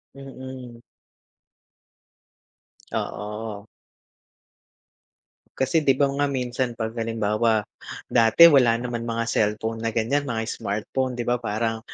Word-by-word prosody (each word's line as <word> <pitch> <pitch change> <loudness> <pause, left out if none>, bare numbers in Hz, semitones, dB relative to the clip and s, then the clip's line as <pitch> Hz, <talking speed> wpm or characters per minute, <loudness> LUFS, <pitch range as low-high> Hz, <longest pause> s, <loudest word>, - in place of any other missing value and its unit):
Mm. 130 -3 -10 2.1
Oo. 105 0 -5 1.9
Kasi, 135 +5 +2
'di 135 -3 +3
ba 140 - +3
nga, 145 +1 0
minsan, 125 -2 -2
pag 110 -1 -3
halimbawa, 110 -1 +1 0.5
dati, 115 +9 +7
wala 125 -5 +5
naman 120 -1 -4
mga 115 0 -1
cellphone 110 +1 -1
na 115 - -1
ganyan, 140 +6 0
mga 115 -3 -2
smartphone. 115 +5 -3
'di 120 - -3
ba, 120 0 0
parang 110 0 -2
115 Hz, 105 wpm, -24 LUFS, 110-130 Hz, 2.1 s, dati